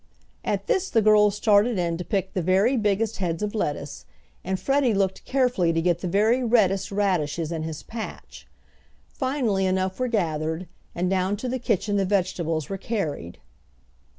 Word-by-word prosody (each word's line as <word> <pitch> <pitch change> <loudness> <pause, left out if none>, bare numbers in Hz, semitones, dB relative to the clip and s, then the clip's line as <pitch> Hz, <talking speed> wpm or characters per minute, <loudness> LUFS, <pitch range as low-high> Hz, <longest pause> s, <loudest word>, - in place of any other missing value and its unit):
At - - -2
this 390 -6 0
the 225 - +2
girls 210 -1 +5
started 210 +2 +3
in 170 -2 0
to 180 - -4
pick 190 0 -2
the 185 - -1
very 190 +9 +3
biggest 215 0 0
heads 175 0 -2
of 210 - -2
lettuce, 145 -8 -3 0.4
and 190 +1 -2
Freddie 270 -5 +2
looked 195 -1 -1
carefully 250 -10 +2
to 165 - +1
get 175 0 +1
the 180 - -4
very 215 +7 +2
reddest 200 -6 +2
radishes 170 -6 0
in 165 -2 -3
his 155 -1 -5
patch. 225 -1 -8 0.6
Finally 250 -9 0
enough 185 +2 -1
were 255 - +1
gathered, 160 -5 -1 0.3
and 175 +1 0
down 190 +2 0
to 250 - -5
the 255 +1 -2
kitchen 205 -3 0
the 195 - +2
vegetables 175 -5 -1
were 195 -1 -5
carried. 160 - -3
195 Hz, 170 wpm, -25 LUFS, 175-220 Hz, 0.6 s, girls